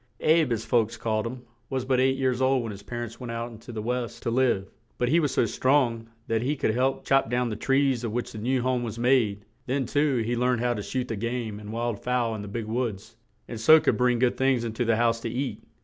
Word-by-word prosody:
"Abe," 155 -4 +3
as 115 -1 -3
folks 115 -2 +1
called 110 0 -1
him, 125 +1 -7 0.3
was 130 -1 -2
but 130 -1 +2
eight 130 +1 +3
years 130 -1 0
old 130 -1 +3
when 115 - -4
his 100 -1 -9
par 120 +3 -5
ents 115 -1 -9
went 125 -2 -6
out 115 +1 -4
into 115 +2 -11
the 110 -2 -5
West 125 0 -3
to 115 - -1
live, 120 -6 +2 0.3
but 125 - 0
he 165 +5 +4
was 150 -5 +1
so - - +2
strong 120 -2 +1 0.2
that 115 -1 0
he 140 +5 0
could 110 - 0
help 130 +3 0
chop 135 -4 +3
down 120 0 0
the 110 - -3
trees 135 +1 +1
of 115 - -2
which 120 +2 -3
the 110 - -7
new 125 +3 0
home 130 -1 +1
was 115 -2 -5
made; 115 -5 +2 0.2
then, 135 +1 0
too, 145 +1 +1
he 120 +2 0
learned 125 0 +1
how 120 0 +1
to 105 - -4
shoot 125 +4 -3
the 115 - -3
game 115 -1 -3
and 105 0 -8
wild 115 -2 -2
fowl 125 -2 0
in 110 - -5
the 105 - -7
big 110 +2 -4
woods, 110 -3 -3 0.3
and 115 - -6
so 155 +8 +7
could - - +1
bring 125 -1 +3
good 125 0 +1
things 130 -3 +2
in 115 -2 -3
to 120 +2 -1
the 115 0 +3
house 115 0 +2
to 115 - -4
eat. 120 -2 -3
120 Hz, 260 wpm, -26 LUFS, 115-130 Hz, 0.3 s, so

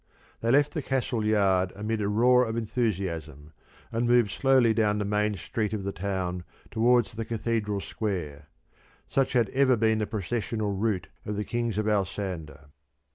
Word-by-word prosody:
They 115 - -1
left 145 +4 +4
the 155 - -2
castle 130 -4 -1
yard 95 -4 +2
amid 105 +2 -2
a 100 - 0
roar 125 +4 +4
of 115 0 -3
enthusiasm, 85 - -3 0.4
and 115 +1 0
moved 120 -4 +4
slowly 130 +1 +4
down 105 -2 +2
the 105 - -1
main 105 +1 +1
street 105 +3 -3
of 105 -3 -3
the 100 - -2
town 90 -2 -3 0.3
towards 120 +1 +3
the 115 +1 -4
Cathedral 110 -2 -2
square. 80 -11 -4 0.6
Such 135 -1 0
had 120 -5 +3
ever 130 -1 +3
been 110 0 +2
the 105 - -1
processional 110 0 -2
route 95 -4 -1
of 105 - -4
the 105 - -2
Kings 120 -2 -2
of 110 - 0
Alsander. 90 -7 -3
105 Hz, 165 wpm, -27 LUFS, 95-115 Hz, 0.6 s, left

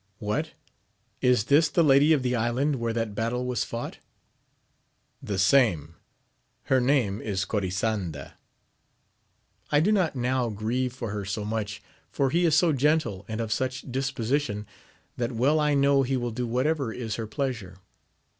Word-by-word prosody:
— 100 - -43
^What! 105 0 -1 0.7
is 125 -4 +3
this 145 +6 +4
the 170 +3 +3
lady 145 +1 +5
of 145 -5 +3
the 125 0 0
island 125 +5 0
where 115 -1 -1
that 115 -2 -2
battle 115 +4 -2
was 125 -1 -1
fought? 115 0 -6 0.6
— - - -45
The 100 - -1
same. 95 - +3 0.4
— - - -46
Her 130 -1 +5
name 125 -6 +1
is 95 -3 -2
Cori 100 -2 -1
sanda. 95 -7 -3 1.4
I 145 - +5
do 180 +8 +3
not 185 -8 +1
now 125 -1 0
grieve 115 +5 -2
for 120 -4 -5
her 105 -1 -3
so 100 +2 -3
much, 105 -1 -4 0.3
for 135 +6 0
he 175 +3 +2
is 160 -3 +4
so 165 -1 +4
gentle 145 -8 +1
and 110 0 -4
of 115 -1 -3
such 130 +2 -2
disposition, 130 -3 -1 0.5
that 120 0 -2
well 135 +7 +2
I 150 -1 +2
know 140 0 +4
he 135 0 0
will 120 -1 -2
do 120 +2 -3
whatever 130 +1 0
is 115 -2 -4
her 115 -1 -4
pleasure. 110 -6 -4
125 Hz, 170 wpm, -26 LUFS, 105-140 Hz, 1.4 s, lady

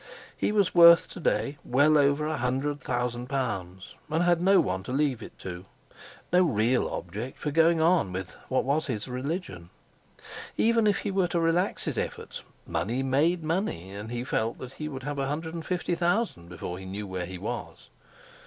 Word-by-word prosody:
He - - 0
was 205 -3 +2
worth 170 -1 +8
to - - -9
day 145 -3 0
well 145 +5 +4
over 145 +1 +3
a 155 0 -1
hundred 135 +4 -1
thousand 120 -1 -2
pounds, 100 -8 -3 0.2
and 160 +3 +1
had 175 -1 +3
no 190 +1 +5
one 95 - 0
to 95 - -7
leave 135 -3 +1
it - - -10
to—no 95 - -4
real 125 -4 +2
object 105 +9 -5
for 150 - -3
going 165 +2 +4
on 165 - +3
with 95 0 -5
what 130 - +2
was 150 +4 0
his 115 -5 -3
religion. 125 - -4 0.9
Even 230 -1 +3
if 205 - +2
he 205 - -2
were 190 -2 +2
to 175 - 0
relax 165 +3 +1
his - - -2
efforts, - - -5 0.2
money 120 +9 -1
made 155 +6 +2
money, 155 - -2
and 105 +3 -6
he 120 0 -3
felt 115 -3 -1
that 130 0 -9
he 155 +2 -5
would 135 -2 -7
have 145 +1 -3
a 135 - 0
hundred 160 +3 -3
and 165 -1 -6
fifty 180 -1 -1
thousand 175 - 0
before 90 +1 -6
he 95 - -9
knew 100 +2 -5
where 90 -2 -4
he 95 0 -7
was. - - -6
140 Hz, 190 wpm, -27 LUFS, 110-170 Hz, 0.9 s, worth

